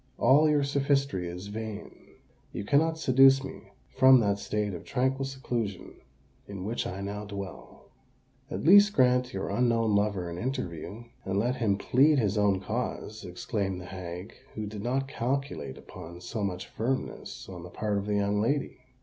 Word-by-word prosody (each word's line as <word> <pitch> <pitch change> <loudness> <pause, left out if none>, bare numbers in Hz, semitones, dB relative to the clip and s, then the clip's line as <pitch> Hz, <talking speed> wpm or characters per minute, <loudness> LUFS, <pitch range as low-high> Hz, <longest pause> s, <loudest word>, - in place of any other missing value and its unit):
"All 145 +5 +5
your 150 -1 +3
sophistry 140 -8 0
is 90 +2 -6
vain. 105 0 -6 0.6
You - - -4
cannot 160 +7 +3
seduce 135 -2 +5
me 135 - -9 0.2
from 130 0 +7
that 100 -2 +1
state 105 -1 -2
of 85 - -7
tranquil 135 +1 0
seclusion 120 -7 -4 0.5
in 95 -2 -6
which 115 +3 -2
I 95 +2 -5
now 100 +1 -4
dwell." 100 -2 -9 0.6
"At - - -4
least 205 +5 +7
grant 125 -3 +3
your 95 0 -3
unknown 115 -1 +2
lover 100 -3 +1
an 85 +1 -5
interview, 115 - -4 0.2
and 95 +1 -2
let 120 +5 +1
him 105 -4 +1
plead 140 +8 +4
his 105 -5 +1
own 100 -2 +2
cause," 110 0 -4
exclaimed 95 +1 -3
the 90 - -9
hag, 90 +2 -7 0.2
who 110 - -3
did 105 0 -6
not 130 +4 -1
calculate 135 - -3
upon 85 +2 -10
so 105 +4 -4
much 90 -2 -3
firmness 130 +4 -4
on 90 -2 -8
the 90 - -9
part 105 +2 -1
of 100 - -6
the 105 - 0
young 100 0 +1
lady. 140 +6 0
110 Hz, 165 wpm, -28 LUFS, 100-130 Hz, 0.6 s, from